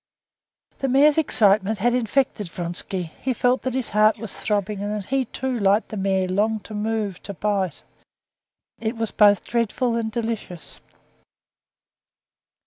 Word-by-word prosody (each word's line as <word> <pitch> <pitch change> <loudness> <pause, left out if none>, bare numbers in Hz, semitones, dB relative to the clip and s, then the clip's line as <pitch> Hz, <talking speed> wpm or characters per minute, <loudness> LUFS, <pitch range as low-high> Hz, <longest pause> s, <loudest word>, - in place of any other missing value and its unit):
The 270 - 0
mare's 285 +4 +5
excitement 215 -7 +3
had 240 +4 +1
infected 245 -4 0
Vronsky. 175 0 -3
He 255 -1 -1
felt 245 +3 +2
that 260 -1 -3
his 260 -3 -2
heart 215 +1 +4
was 220 -2 -7
throbbing, 205 -1 -2
and 205 +1 -2
that 205 -2 -5
he, 265 +3 0
too, 255 +1 -3
like 200 +2 +2
the - - -6
mare, 190 -1 0
longed 210 +3 0
to 215 - -10
move, 210 -3 -2
to 200 - -7
bite; 195 -5 -1 1.0
it 225 +1 -3
was 225 -1 -1
both 205 -3 +4
dreadful 235 +1 0
and 225 -1 -2
delicious. 220 -7 -5
215 Hz, 145 wpm, -23 LUFS, 200-235 Hz, 1.0 s, mare's